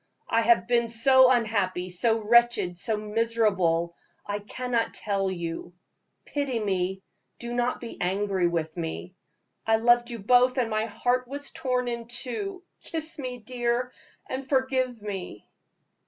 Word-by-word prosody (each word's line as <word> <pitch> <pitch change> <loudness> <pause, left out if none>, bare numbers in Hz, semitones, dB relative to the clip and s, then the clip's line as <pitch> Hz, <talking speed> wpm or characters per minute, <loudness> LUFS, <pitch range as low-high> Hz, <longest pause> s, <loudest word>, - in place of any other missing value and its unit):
I 230 - +2
have 230 -5 +4
been 235 -1 +2
so 260 +3 +6
unhappy, 200 -7 0
so 225 +5 +1
wretched, 235 -6 +4
so 215 +5 -1
miserable, 210 -6 0 0.3
I 205 0 -3
cannot 235 +2 -2
tell 195 -2 -1
you. 170 -1 -5 0.5
Pity 280 -5 -2
me 190 -2 -1 0.3
do 240 0 -6
not 245 +1 0
be 235 - -9
angry 190 0 +1
with 160 -2 -2
me. 170 +2 -5 0.5
I 225 - +5
loved 240 +2 +3
you 235 - -4
both, 250 +5 +4
and 235 -3 0
my 215 0 +1
heart 245 +3 -1
was 285 +2 -6
torn 250 -1 -1
in 235 -1 -4
two. 270 - -3 0.2
Kiss 320 -1 -2
me, 255 -2 -4
dear, 245 +1 -2 0.4
and 265 0 -5
forgive 260 -3 +1
me." 190 - -6
230 Hz, 140 wpm, -26 LUFS, 195-250 Hz, 0.5 s, so